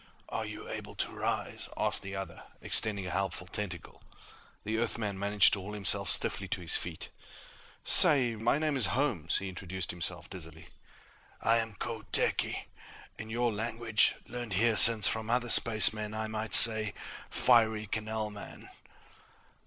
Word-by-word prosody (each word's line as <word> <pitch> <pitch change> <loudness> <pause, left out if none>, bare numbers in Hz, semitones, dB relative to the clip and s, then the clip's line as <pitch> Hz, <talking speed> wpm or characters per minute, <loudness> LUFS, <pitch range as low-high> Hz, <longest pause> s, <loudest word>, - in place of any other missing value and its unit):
"Are - - -4
you - - -9
able - - -8
to - - -4
rise?" - - -5
asked - - -2
the 100 0 -8
other, 95 0 -7 0.2
extending 100 -3 +1
a 90 - -5
helpful 95 -1 -3
tentacle. 95 -2 -6 0.6
The 110 +2 -3
Earthman 110 -4 -3
managed 100 0 +3
to 100 - 0
haul 105 +3 -8
himself 100 -3 -1
stiffly 100 - -1
to 95 - -4
his 85 - -2
feet. 85 -2 -6 0.8
"Say, 130 -6 +7
my 115 +5 0
name 155 -1 -1
is 125 -8 +2
Holmes," 110 - -1
he 100 - -5
introduced 95 0 -6
himself 85 -1 -6
dizzily. 80 -4 -11 0.7
"I 115 +1 +2
am 115 -2 -5
Kho 115 -1 -5
Theki. - - 0 0.6
In 110 - -8
your 120 0 -1
language, 110 +1 0
learned 120 -5 -6
years 115 +2 +3
since 115 -3 +6
from 110 0 -2
other 120 -1 0
spacemen, 110 -1 +3
I 110 0 -3
might 110 0 0
say 110 -3 +7 0.3
'Fiery 110 -3 +2
Canalman.'" 110 0 -6
110 Hz, 150 wpm, -29 LUFS, 95-115 Hz, 0.8 s, Say